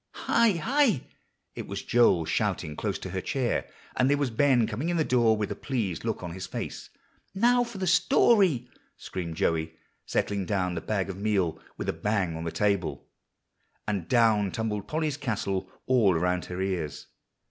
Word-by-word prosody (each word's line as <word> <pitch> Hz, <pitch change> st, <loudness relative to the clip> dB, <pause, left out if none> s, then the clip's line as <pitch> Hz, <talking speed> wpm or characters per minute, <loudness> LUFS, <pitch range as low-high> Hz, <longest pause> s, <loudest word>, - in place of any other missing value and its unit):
"Hi 230 Hz, -3 st, +4 dB
hi!" 230 Hz, -, +2 dB, 0.5 s
It -, -, -7 dB
was 100 Hz, 0 st, -5 dB
Joel 100 Hz, -9 st, +4 dB
shouting 75 Hz, 0 st, -1 dB
close -, -, -2 dB
to -, -, -7 dB
her -, -, -2 dB
chair, -, -, -1 dB, 0.3 s
and 130 Hz, +1 st, +3 dB
there 145 Hz, -, +3 dB
was 140 Hz, -4 st, -1 dB
Ben 125 Hz, 0 st, +3 dB
coming 120 Hz, +10 st, -3 dB
in 175 Hz, -, 0 dB
the 160 Hz, -, +3 dB
door 120 Hz, -5 st, +3 dB
with 105 Hz, -1 st, -2 dB
a -, -, -2 dB
pleased 110 Hz, -, -3 dB
look 110 Hz, -4 st, -3 dB
on 85 Hz, -1 st, -5 dB
his 95 Hz, +1 st, -6 dB
face. -, -, -6 dB, 0.5 s
"Now 245 Hz, +4 st, +4 dB
for 235 Hz, -3 st, -8 dB
the 190 Hz, -, -2 dB
story," 185 Hz, -, +4 dB, 0.3 s
screamed 85 Hz, -3 st, -5 dB
Joey, 80 Hz, 0 st, 0 dB, 0.3 s
setting 100 Hz, -3 st, -1 dB
down 95 Hz, -3 st, 0 dB
the 85 Hz, -, -3 dB
bag 100 Hz, -3 st, -1 dB
of 95 Hz, -, -9 dB
meal 100 Hz, -5 st, 0 dB, 0.2 s
with -, -, -5 dB
a -, -, +1 dB
bang 100 Hz, -6 st, -1 dB
on 80 Hz, +1 st, -5 dB
the 85 Hz, -, -2 dB
table; 95 Hz, -9 st, -1 dB, 0.8 s
and 100 Hz, -5 st, -2 dB
down 110 Hz, -5 st, +3 dB
tumbled 105 Hz, -3 st, -3 dB
Polly's 155 Hz, -1 st, -1 dB
castle 100 Hz, -8 st, -2 dB, 0.2 s
all 115 Hz, -8 st, +4 dB
around 90 Hz, +2 st, 0 dB
her 90 Hz, 0 st, -6 dB
ears. 90 Hz, -6 st, -3 dB
105 Hz, 180 wpm, -27 LUFS, 90-135 Hz, 0.8 s, Hi